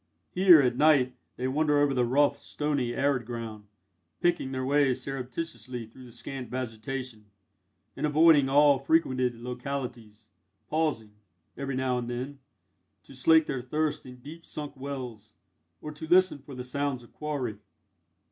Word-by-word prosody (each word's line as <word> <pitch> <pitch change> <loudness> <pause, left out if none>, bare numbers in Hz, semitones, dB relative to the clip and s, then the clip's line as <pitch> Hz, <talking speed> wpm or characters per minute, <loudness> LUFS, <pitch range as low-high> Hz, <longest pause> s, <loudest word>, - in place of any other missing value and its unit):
Here, 180 -3 +7
at 125 -1 +1
night, 140 -4 +4 0.2
they 130 - -1
wander 150 +2 +2
over 145 -1 +3
the 125 -2 +2
rough, 140 +4 +2
stony, 145 -5 -2
arid 140 -3 +1
ground, 115 -3 -6 0.5
picking 170 -6 +1
their 130 -1 -2
way 140 -1 +3
surreptitiously 125 -2 -6
through 125 +4 -14
the 120 - -13
scant 125 +1 -7
vegetation, 125 -1 -5 0.7
and 150 +3 0
avoiding 150 -2 +5
all 145 0 +5
frequented 130 -4 +1
localities; 120 -3 -6 0.4
pausing, 150 -9 0 0.4
every 140 -1 -4
now 130 -1 0
and 120 0 -5
then, 130 +3 -5 0.6
to - - -15
slake 160 +5 +4
their 130 - -3
thirst 150 +3 -2
in 125 - -10
deep 150 +7 -11
sunk 150 -1 -7
wells, 125 -6 -7 0.5
or 150 - -5
to 150 +1 -8
listen 185 -3 +4
for 140 0 -11
the 125 - -5
sounds 135 0 -2
of 120 - -19
quarry. 135 -9 -4
130 Hz, 145 wpm, -28 LUFS, 125-145 Hz, 0.7 s, Here